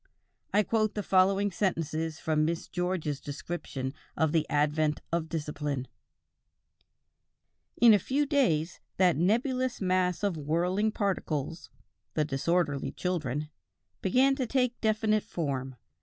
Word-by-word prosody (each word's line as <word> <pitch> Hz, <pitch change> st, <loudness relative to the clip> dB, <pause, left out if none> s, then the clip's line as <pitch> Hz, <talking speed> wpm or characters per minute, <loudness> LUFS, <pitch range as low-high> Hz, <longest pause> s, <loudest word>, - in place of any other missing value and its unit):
I 210 Hz, +1 st, +4 dB
quote 215 Hz, 0 st, 0 dB
the 210 Hz, -, -2 dB
following 195 Hz, +2 st, +3 dB
sentences 165 Hz, -4 st, -1 dB
from 155 Hz, -1 st, +1 dB
Miss 165 Hz, +1 st, -1 dB
George's 175 Hz, -6 st, -2 dB
description 140 Hz, -3 st, -5 dB, 0.2 s
of 160 Hz, -2 st, +2 dB
the 160 Hz, -1 st, +1 dB
advent 150 Hz, 0 st, +1 dB
of 165 Hz, -1 st, -1 dB
discipline: 150 Hz, -4 st, -3 dB, 1.9 s
"In 235 Hz, -1 st, +8 dB
a 205 Hz, -, +5 dB
few 275 Hz, +9 st, 0 dB
days 185 Hz, -, +1 dB, 0.2 s
that 180 Hz, -2 st, +4 dB
nebulous 245 Hz, -, +1 dB
mass 185 Hz, -1 st, +1 dB
of 200 Hz, -5 st, 0 dB
whirling 175 Hz, +8 st, +1 dB
particles 170 Hz, -7 st, -2 dB, 0.5 s
the 155 Hz, -, +2 dB
disorderly 145 Hz, +1 st, 0 dB
children 150 Hz, -5 st, -2 dB, 0.5 s
began 260 Hz, +8 st, +3 dB
to 255 Hz, -, -1 dB
take 250 Hz, -1 st, 0 dB
definite 215 Hz, -1 st, +2 dB
form. 135 Hz, -8 st, -3 dB
175 Hz, 120 wpm, -29 LUFS, 150-210 Hz, 1.9 s, In